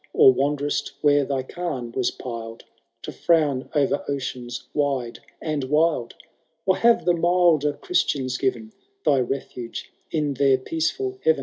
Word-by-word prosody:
Or 130 Hz, -, +7 dB
wanderVt 145 Hz, +2 st, -1 dB
where 145 Hz, -1 st, +4 dB
thy 135 Hz, -1 st, -1 dB
cairn 130 Hz, -6 st, -4 dB
was 125 Hz, +1 st, 0 dB
piled 115 Hz, -2 st, -7 dB, 0.4 s
To -, -, -5 dB
frown 150 Hz, -6 st, +1 dB
o*er 145 Hz, -1 st, +2 dB
oceans 125 Hz, -3 st, -4 dB
wide 135 Hz, -5 st, -1 dB, 0.2 s
and 150 Hz, -4 st, -2 dB
wild? 150 Hz, -3 st, +1 dB, 0.5 s
Or 190 Hz, -1 st, +3 dB
have 235 Hz, +3 st, +4 dB
the 175 Hz, -, +4 dB
milder 170 Hz, -4 st, +3 dB
Christians 135 Hz, -, -1 dB
given 120 Hz, -5 st, -2 dB, 0.3 s
Thy 140 Hz, -, +4 dB
refuge 125 Hz, -2 st, -4 dB, 0.2 s
in 150 Hz, -3 st, 0 dB
their 135 Hz, 0 st, +3 dB
peacefiil 165 Hz, -, -2 dB
heaven 475 Hz, 0 st, +3 dB
140 Hz, 135 wpm, -24 LUFS, 130-160 Hz, 0.5 s, Or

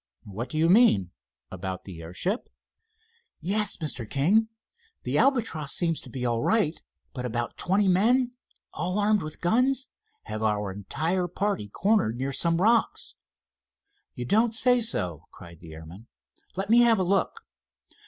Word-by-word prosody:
"What 110 Hz, +5 st, -6 dB
do 155 Hz, -, -5 dB
you 160 Hz, +1 st, +3 dB
mean—about 95 Hz, -, 0 dB
the 90 Hz, -4 st, -10 dB
airship?" 135 Hz, -, -3 dB, 0.9 s
"Yes, 205 Hz, +6 st, +1 dB
Mr. 135 Hz, -8 st, -4 dB
King. 190 Hz, +11 st, +2 dB, 0.6 s
The -, -, +1 dB
Albatross 220 Hz, -, +1 dB
seems 165 Hz, -3 st, 0 dB
to -, -, -10 dB
be 125 Hz, -2 st, -4 dB
all 120 Hz, -1 st, 0 dB
right, 205 Hz, -, +1 dB, 0.3 s
but 125 Hz, -3 st, -5 dB
about 120 Hz, -1 st, -3 dB
twenty 195 Hz, +3 st, +1 dB
men, 240 Hz, +7 st, +3 dB, 0.4 s
all 180 Hz, +3 st, -2 dB
armed 210 Hz, 0 st, +2 dB
with 155 Hz, -2 st, -8 dB
guns, 255 Hz, +8 st, +1 dB, 0.3 s
have 110 Hz, -, -6 dB
our 105 Hz, -2 st, 0 dB
entire 165 Hz, -, -2 dB
party 180 Hz, -, -2 dB
cornered 195 Hz, -, +1 dB
near 135 Hz, +2 st, -3 dB
some 165 Hz, +4 st, +1 dB
rocks." 230 Hz, -, +1 dB, 1.0 s
"You 125 Hz, -, -5 dB
don't 220 Hz, -, +2 dB
say 245 Hz, +1 st, +3 dB
so!" 90 Hz, -, -3 dB
cried 85 Hz, -2 st, -14 dB
the 80 Hz, -2 st, -11 dB
airman. 85 Hz, +8 st, -12 dB, 0.5 s
"Let 195 Hz, +3 st, -3 dB
me 235 Hz, -, +7 dB
have 235 Hz, -2 st, +5 dB
a 190 Hz, -, +1 dB
look." 195 Hz, -, 0 dB
170 Hz, 145 wpm, -26 LUFS, -, 1.0 s, me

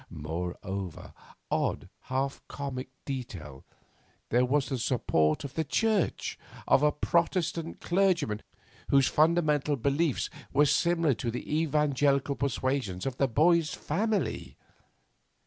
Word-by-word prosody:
Moreover, 90 Hz, +3 st, -5 dB, 0.4 s
odd, -, -, 0 dB, 0.2 s
half 135 Hz, +1 st, -2 dB
comic 135 Hz, -2 st, -5 dB, 0.2 s
detail 95 Hz, -, -6 dB, 0.7 s
there 125 Hz, +2 st, +3 dB
was 135 Hz, +2 st, +1 dB
the 135 Hz, -3 st, -2 dB
support 80 Hz, -, +1 dB
of 140 Hz, -1 st, -6 dB
the 160 Hz, -, 0 dB
Church, 215 Hz, +5 st, 0 dB, 0.3 s
of -, -, +5 dB
a 150 Hz, 0 st, +4 dB
protestant 170 Hz, -1 st, 0 dB
clergyman 175 Hz, -, +1 dB, 0.5 s
whose 135 Hz, -2 st, +5 dB
fundamental 150 Hz, -2 st, +2 dB
beliefs 140 Hz, +3 st, 0 dB, 0.2 s
were 145 Hz, +2 st, +4 dB
similar 165 Hz, +1 st, +2 dB
to 115 Hz, +1 st, -3 dB
the 120 Hz, -, -4 dB, 0.2 s
evangelical 145 Hz, -2 st, +2 dB
persuasions 130 Hz, -8 st, -1 dB
of 135 Hz, -2 st, -3 dB
the 135 Hz, -, +3 dB
boy's 160 Hz, +5 st, +3 dB
family. 195 Hz, -, -2 dB
140 Hz, 110 wpm, -29 LUFS, 125-160 Hz, 0.7 s, of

